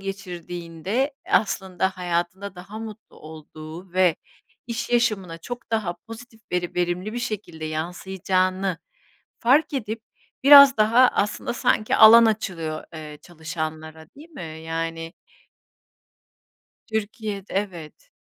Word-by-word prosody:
geçirdiğinde 185 Hz, -, -4 dB
aslında 190 Hz, -3 st, +1 dB
hayatında 180 Hz, +2 st, -3 dB
daha 190 Hz, +4 st, -9 dB
mutlu 220 Hz, -1 st, -10 dB
olduğu 155 Hz, +3 st, -11 dB
ve 185 Hz, -2 st, +3 dB, 0.5 s
iş 230 Hz, -1 st, -4 dB
yaşamına 215 Hz, -8 st, +1 dB
çok 240 Hz, +7 st, -8 dB
daha 210 Hz, -6 st, 0 dB
pozitif 225 Hz, 0 st, -11 dB
veri 175 Hz, -1 st, -1 dB
verimli 180 Hz, +3 st, -1 dB
bir 240 Hz, -, -3 dB
şekilde 200 Hz, -9 st, -5 dB
yansıyacağını 185 Hz, +3 st, -1 dB, 0.6 s
fark 290 Hz, +6 st, +3 dB
edip 225 Hz, -4 st, -3 dB, 0.4 s
biraz 280 Hz, -1 st, +10 dB
daha 230 Hz, +4 st, +5 dB
aslında 210 Hz, +2 st, -1 dB
sanki 215 Hz, -2 st, +1 dB
alan 230 Hz, +2 st, +9 dB
açılıyor, 175 Hz, -8 st, -2 dB
eee, 155 Hz, -2 st, -8 dB
çalışanlara, 160 Hz, -2 st, -6 dB
değil 305 Hz, +4 st, -14 dB
mi? 160 Hz, -, -8 dB
Yani 165 Hz, 0 st, -4 dB, 1.7 s
Türkiye'de 215 Hz, -2 st, -4 dB
Evet. 190 Hz, -, -5 dB
190 Hz, 105 wpm, -24 LUFS, 165-220 Hz, 1.7 s, biraz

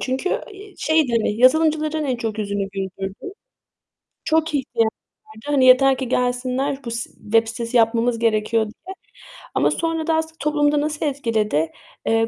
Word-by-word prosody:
çünkü, 265 Hz, +8 st, -2 dB
ııı, -, -, -1 dB, 0.4 s
şeydi, 315 Hz, -5 st, +2 dB
hani, 220 Hz, -, +1 dB
yazılımcıların 310 Hz, +3 st, +3 dB
en 260 Hz, -3 st, -1 dB
çok 225 Hz, -2 st, -4 dB
yüzünü 200 Hz, -1 st, -2 dB
güldürdü. 195 Hz, -, -6 dB, 0.9 s
Çok 320 Hz, 0 st, +1 dB
ihtiyaç 245 Hz, -4 st, 0 dB, 0.4 s
vardı. 220 Hz, 0 st, -15 dB
Hani, 285 Hz, -3 st, +3 dB
yeter 260 Hz, +1 st, +6 dB
ki 260 Hz, -1 st, -3 dB
gelsinler 255 Hz, +3 st, -1 dB
bu 235 Hz, -, -4 dB
s 235 Hz, +1 st, -4 dB
web 225 Hz, +1 st, 0 dB
sitesi 230 Hz, +2 st, -2 dB
yapmamız 230 Hz, +1 st, +2 dB
gerekiyor 225 Hz, 0 st, +1 dB
diye 345 Hz, -, -10 dB, 0.6 s
ama -, -, +3 dB
sonra 325 Hz, -1 st, -2 dB
da 325 Hz, -, +2 dB
aslında 320 Hz, 0 st, -2 dB
toplumu 295 Hz, 0 st, +2 dB
da 295 Hz, -1 st, +1 dB
nasıl 300 Hz, +1 st, -2 dB
etkiledi? 220 Hz, -, 0 dB, 0.3 s
Eee, 225 Hz, 0 st, +2 dB
255 Hz, 155 wpm, -21 LUFS, 225-300 Hz, 0.9 s, yeter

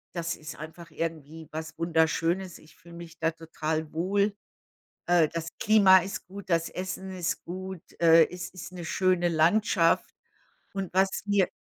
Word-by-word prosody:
das 170 Hz, 0 st, -2 dB
ist 155 Hz, +1 st, -9 dB
einfach 165 Hz, +2 st, -10 dB
irgendwie 160 Hz, -1 st, -5 dB
was 160 Hz, +1 st, -6 dB
Wunderschönes. 165 Hz, +2 st, +1 dB
Ich 155 Hz, -, -19 dB
fühle 170 Hz, 0 st, -16 dB
mich 170 Hz, -1 st, -10 dB
da 165 Hz, 0 st, +1 dB
total 160 Hz, -1 st, -4 dB
wohl. 200 Hz, +4 st, +1 dB, 0.7 s
Äh, 170 Hz, -3 st, +5 dB
das 165 Hz, +1 st, -4 dB
Klima 200 Hz, -3 st, +7 dB
ist 190 Hz, 0 st, -6 dB
gut, 195 Hz, 0 st, -10 dB
das 165 Hz, 0 st, +2 dB
Essen 190 Hz, +1 st, -5 dB
ist 180 Hz, -3 st, -2 dB
gut. 185 Hz, 0 st, -6 dB, 0.2 s
Äh, 165 Hz, -1 st, +7 dB
es 180 Hz, 0 st, -6 dB
ist 185 Hz, 0 st, -9 dB
'ne 175 Hz, -2 st, -7 dB
schöne 180 Hz, 0 st, +2 dB
Landschaft. 170 Hz, +2 st, +3 dB, 0.6 s
Und 195 Hz, -2 st, -4 dB
was 190 Hz, +1 st, +4 dB, 0.2 s
mir 200 Hz, -2 st, +3 dB
170 Hz, 155 wpm, -28 LUFS, 160-190 Hz, 0.7 s, Klima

